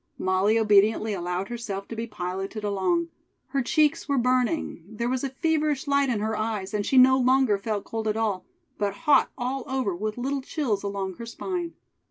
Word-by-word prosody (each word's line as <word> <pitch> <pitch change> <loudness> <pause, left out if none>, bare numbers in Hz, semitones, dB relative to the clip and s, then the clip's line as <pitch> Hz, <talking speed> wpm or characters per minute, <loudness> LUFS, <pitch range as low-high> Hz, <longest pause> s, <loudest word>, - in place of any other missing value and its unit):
Molly 190 +4 +2
obediently 215 0 +3
allowed 180 +1 -3
herself 215 -5 -5
to 230 - -5
be 230 +1 -4
piloted 195 +1 -5
along. 210 - 0 0.4
Her 275 - 0
cheeks 305 +4 +1
were 280 - +2
burning; 250 - 0
there 230 +2 -3
was 255 +1 -1
a 275 - -1
feverish 305 0 0
light 280 -1 +2
in 220 -4 0
her 220 +1 -1
eyes, 215 -3 -3
and 210 -1 0
she 265 - +1
no 260 +1 +7
longer 255 -5 +3
felt 210 0 -2
cold 225 -1 -4
at 215 0 0
all, 210 -5 -1 0.4
but 200 -1 -1
hot 285 -2 +5
all 255 +1 -2
over 260 -8 -1
with 215 +4 -3
little 270 +3 -2
chills 260 -7 -1
along 195 -2 -4
her 235 - -7
spine. 345 +8 -4
225 Hz, 190 wpm, -26 LUFS, 205-265 Hz, 0.4 s, no